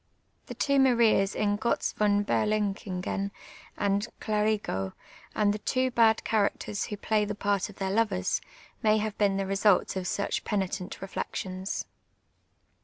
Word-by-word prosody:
The - - -7
two 280 -1 +2
.Marias 235 -6 +4
in 205 -1 +1
(ibtz 235 +1 0
von 205 -1 +2
BcrluhiiKjen 200 -2 -1 0.5
and 200 +2 +1
Cluvitjo^ 210 - -1 0.4
and 205 -1 +3
the 210 - -4
two 255 +4 0
bad 225 -2 +4
cha 220 - +1
racters 205 0 -1
who 210 - -5
play 215 +1 +1
the 210 0 -3
part 200 -1 0
of 205 - -12
their 190 -1 -2
lovers, 210 - +1 0.4
may 215 0 +4
have 215 -1 -2
been 200 -2 +3
the 195 - -1
results 195 0 +2
of 185 -1 -3
such 200 - -1
penitent 195 -2 -3
reflections. 190 0 -4
205 Hz, 145 wpm, -28 LUFS, 195-215 Hz, 0.5 s, Marias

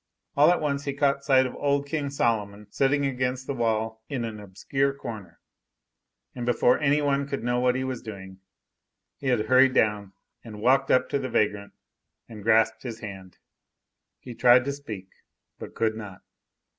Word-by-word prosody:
All 145 +3 +6
at 175 - +3
once 140 -2 -2
he 140 - -2
caught 140 -1 +1
sight 130 -2 +4
of 130 - -4
old 140 0 0
King 145 -1 -3
Solomon 105 -6 -1
sitting 140 +1 +1
against 130 -1 -2
the 140 - -3
wall 110 -2 -1
in 130 -5 -2
an 110 -2 -6
obscure 135 +8 -2
corner; 110 -10 -9 0.9
and 120 - -6
before 120 +1 +2
any 150 0 +2
one 140 -1 0
could 140 -3 -4
know 120 0 0
what 125 0 +2
he 130 - -1
was 130 -2 -4
doing, 95 -3 -10 0.8
he 140 - -6
had 120 -4 +1
hurried 130 0 +4
down 105 -2 +1 0.3
and 110 -3 -10
walked 130 +5 +3
up 130 - +3
to 140 - 0
the 130 -1 -4
vagrant 105 -1 -1 0.5
and 110 -2 -10
grasped 115 +1 +2
his 115 -3 -7
hand. 95 -3 -9 0.8
He 125 - -10
tried 125 +2 +5
to 140 - -1
speak, 110 -10 -8 0.5
but - - -9
could 110 -1 0
not. 105 -4 -9
125 Hz, 175 wpm, -26 LUFS, 110-140 Hz, 0.9 s, All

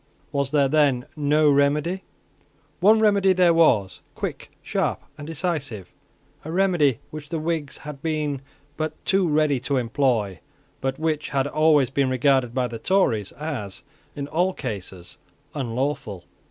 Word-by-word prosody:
Was 140 -1 0
there 140 -1 +3
then 140 -3 +2
no 150 +1 +3
remedy? 150 +6 +2 0.8
One 210 +5 +6
remedy 200 -3 +4
there 180 -2 +4
was, 115 - +3
quick, - - -5
sharp, - - -1
and 145 0 -9
decisive, 145 - -3 0.5
a 160 - -6
remedy 175 - +2
which 150 -1 -8
the 165 - -2
Whigs 155 -2 -2
had 145 -2 -9
been 150 -3 -2 0.4
but 155 0 -3
too 190 -2 +2
ready 150 -3 +2
to 135 +2 -1
employ, 115 -6 0 0.4
but 135 0 -1
which 155 -1 -1
had 135 -2 0
always 150 -3 +3
been 135 -1 +1
regarded 130 -1 +2
by 125 +1 0
the 115 -1 -7
Tories 115 - +1
as, 135 -11 -5 0.3
in 140 -1 -4
all 175 +5 +1
cases, 95 - -7 0.3
unlawful. 125 -7 -3
145 Hz, 140 wpm, -24 LUFS, 130-160 Hz, 0.8 s, One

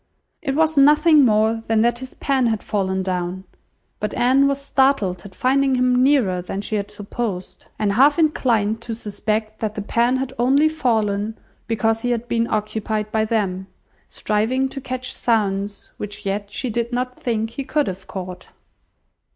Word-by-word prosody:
It 270 - -2
was 315 0 +2
nothing 300 +1 +6
more 220 0 +2
than 225 -1 +3
that 240 +1 +2
his 260 0 -9
pen 265 -3 +1
had 220 -2 -1
fallen 190 -2 -1
down; 185 0 -3 0.6
but 210 - -3
Anne 265 +3 +4
was 275 0 0
startled 265 -10 +1
at 190 - -11
finding 270 +1 +2
him 250 0 +3
nearer 250 -10 +3
than 195 +2 -5
she 205 - -6
had 200 0 -3
supposed, 205 -2 -5
and 210 -2 +1
half 280 +6 +5
inclined 230 -9 +1
to 230 -2 -5
suspect 215 0 -3
that 215 -1 -3
the 210 - -4
pen 235 +4 +2
had 265 0 -3
only 275 +5 +4
fallen 220 -7 0 0.3
because 225 0 0
he 245 - -1
had 240 0 -1
been 230 -1 0
occupied 215 0 -2
by 220 0 +1
them, 195 -4 -1 0.4
striving 235 +6 0
to 275 - -7
catch 255 -1 -4
sounds, 205 -3 -1
which 205 -1 -7
yet 200 +1 -2
she 250 +3 -3
did 235 +2 -2
not 250 +1 -3
think 225 -2 -1
he 275 - -5
could 295 +2 0
have 190 -2 -6
caught. 185 -1 -7
225 Hz, 170 wpm, -21 LUFS, 205-260 Hz, 0.6 s, nothing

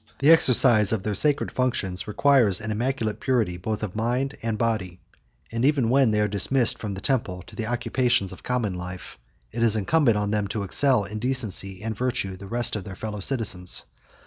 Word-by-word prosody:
The 145 +4 +4
exercise 120 -9 +5
of 110 -4 -1
their 105 - -2
sacred 145 +7 +1
functions 105 -8 -1
requires 115 -4 +3
an 110 +1 -5
immaculate 115 -1 -2
purity, 115 -9 0
both 110 +4 -4
of 105 -3 -5
mind 125 +5 -1
and 115 -1 -2
body; 105 -6 -2 0.5
and 115 +1 -2
even 135 -5 +2
when 135 -2 +4
they 105 -1 +1
are 105 - +2
dismissed 110 +5 +1
from 105 -3 -5
the 95 - -7
temple 100 -10 -2
to 90 - -14
the 110 -2 -4
occupations 120 -3 0
of - - -13
common 120 -6 -2
life, 90 -5 -8 0.3
it 115 - -5
is 115 -2 +4
incumbent 115 - +2
on 105 0 -2
them 105 -1 -1
to 105 0 -4
excel 125 +3 +3
in 105 +2 -6
decency 105 -6 -1
and 110 0 -4
virtue 105 -5 -2
the 100 +1 -11
rest 120 +2 +1
of 105 - -4
their 95 0 -9
fellow 105 +1 -6
citizens. 100 -6 0
110 Hz, 200 wpm, -24 LUFS, 100-125 Hz, 0.5 s, exercise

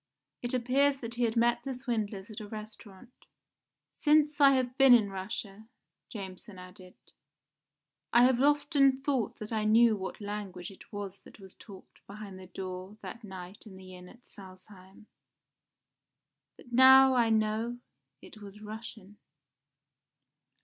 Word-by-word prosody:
It 245 +1 -2
appears 270 +3 +2
that 235 -3 -6
he 240 0 0
had 225 0 -2
met 235 +1 +2
the 270 -2 -4
swindlers 220 -5 -4
at 210 - -8
a 210 - -8
restaurant." 215 +1 -11 0.8
"Since 300 -1 +2
I 275 -1 +7
have 255 -1 -1
been 270 -2 +7
in 210 -4 +1
Russia," 195 +2 -7 0.4
Jameson 190 -1 -9
added, 185 0 -14 1.2
"I 240 - +5
have 255 0 +3
often 280 -2 +2
thought 270 -6 -1
that 215 +1 -7
I 215 -1 -1
knew 225 +1 +4
what 190 -2 -7
language 205 -3 -7
it 190 - -17
was 200 -2 -7
that - - -17
was 190 -1 -14
talked 195 -4 -15
behind 200 -2 -10
the 185 - -12
door 185 +2 -8
that 235 - -9
night 190 +1 -10
in 195 - -12
the 185 -1 -12
inn 180 0 -13
at 245 0 -20
Salzheim, 190 +1 -15 1.5
but 240 - -16
now 265 +1 +7
I 240 -3 +2
know 220 +2 0 0.5
it 215 - -14
was 205 0 -12
Russian." 215 -1 -10
215 Hz, 145 wpm, -29 LUFS, 195-245 Hz, 1.5 s, I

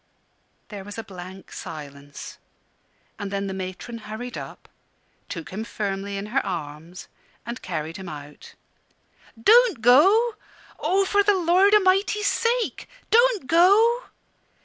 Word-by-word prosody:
There 205 -3 -7
was 205 +2 -9
a 225 - -4
blank 185 0 -11
silence, 145 -2 -9 0.8
and 205 - -4
then 200 0 -2
the 195 - -4
matron 190 +5 -6
hurried 220 +3 -7
up, - - -9 0.6
took 165 0 -7
him 205 +4 -4
firmly 200 -2 -4
in 200 - -4
her 270 - +2
arms, 165 0 -6 0.4
and 235 +2 -6
carried 165 -1 -4
him 190 -2 -8
out. 145 -1 -11 0.8
"Don't 450 - +5
go 390 - +5 0.4
oh, 390 +1 +2
for 405 +1 +3
the 405 0 +3
Lord 370 +4 +4
A'mighty's 400 +1 +2
sake, 470 +1 0 0.2
don't 470 - +4
go!" 410 - +4
225 Hz, 125 wpm, -24 LUFS, -, 0.8 s, Don't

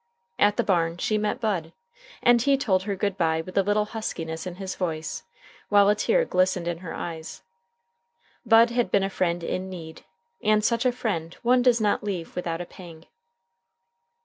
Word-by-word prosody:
At 205 0 +4
the - - +2
barn 170 -3 +1
she 215 +4 0
met 210 0 -1
Bud, 180 -8 -2 0.5
and 240 -1 +5
he 275 +2 +3
told 195 -8 +1
her 200 +1 -3
good 200 0 -2
by 160 -1 +2
with 185 +3 -10
a 195 - +5
little 205 +2 +1
huskiness 165 -7 -5
in 180 - -6
his 190 0 -5
voice, 160 -4 -3 0.5
while 205 -1 +5
a - - +6
tear - - +2
glistened 185 - +1
in 170 -1 -2
her 180 -2 -7
eyes. 160 -2 -7 1.0
Bud 230 +1 +5
had 240 0 0
been 200 - +2
a 195 - -2
friend 175 -2 -1
in 185 +3 -3
need, 165 -3 -9 0.4
and 215 0 +2
such 235 +1 +2
a - - +3
friend 185 -9 -3
one 250 +1 +4
does 245 -2 +4
not 210 -1 +1
leave 185 -5 -4
without 170 -1 -3
a - - -5
pang. 170 -2 -13
190 Hz, 185 wpm, -25 LUFS, 170-215 Hz, 1.0 s, a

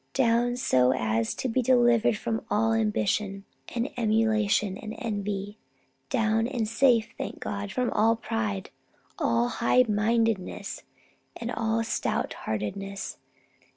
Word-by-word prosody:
Down 245 -1 +2
so 130 - +3
as 110 -2 0
to - - -2
be 255 +2 +1
delivered 240 -3 +4
from 225 0 -2
all 225 +2 +2
ambition 205 -2 0 0.3
and 235 +1 0
emulation 215 -3 +2
and 215 +2 -7
envy. 205 -3 -4 0.5
Down, 225 -2 +1
and 240 -4 -2
safe, 230 0 +3
thank - - -5
God, 200 0 -4
from 250 +4 0
all 225 +2 +3
pride, 110 - -3 0.5
all 115 +1 +2
high 250 - +3
mindedness, 220 -1 0 0.6
and 235 +1 -4
all 225 -1 0
stout 225 - -1
heartedness. 195 - -4
220 Hz, 120 wpm, -27 LUFS, 200-230 Hz, 0.6 s, delivered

